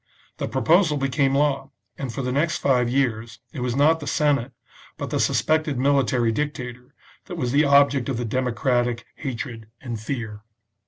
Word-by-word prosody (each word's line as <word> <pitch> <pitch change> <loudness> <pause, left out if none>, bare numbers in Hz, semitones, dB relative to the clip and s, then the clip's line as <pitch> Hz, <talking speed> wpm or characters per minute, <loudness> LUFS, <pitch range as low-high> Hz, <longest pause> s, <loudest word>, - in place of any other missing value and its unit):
The - - -3
proposal 155 - +3
became 135 0 +1
law, 140 -1 +1 0.3
and 135 -3 -5
for 135 - -4
the 125 - -1
next 155 +5 +1
five 125 -3 +2
years 115 -4 -1 0.2
it 145 - -6
was 125 -1 -1
not 155 +4 +4
the 145 - -7
Senate, 140 -4 +1 0.5
but - - -5
the - - 0
suspected 155 -3 +1
military 130 -3 +2
dictator, 125 -1 -5 0.3
that 180 -3 -7
was 125 -6 -1
the 145 +3 +4
object 140 -2 +4
of 130 - -1
the 120 - -2
democratic 120 0 0
hatred 120 -4 -5
and 120 -4 -5
fear. 110 -4 -5
130 Hz, 165 wpm, -23 LUFS, 120-145 Hz, 0.5 s, not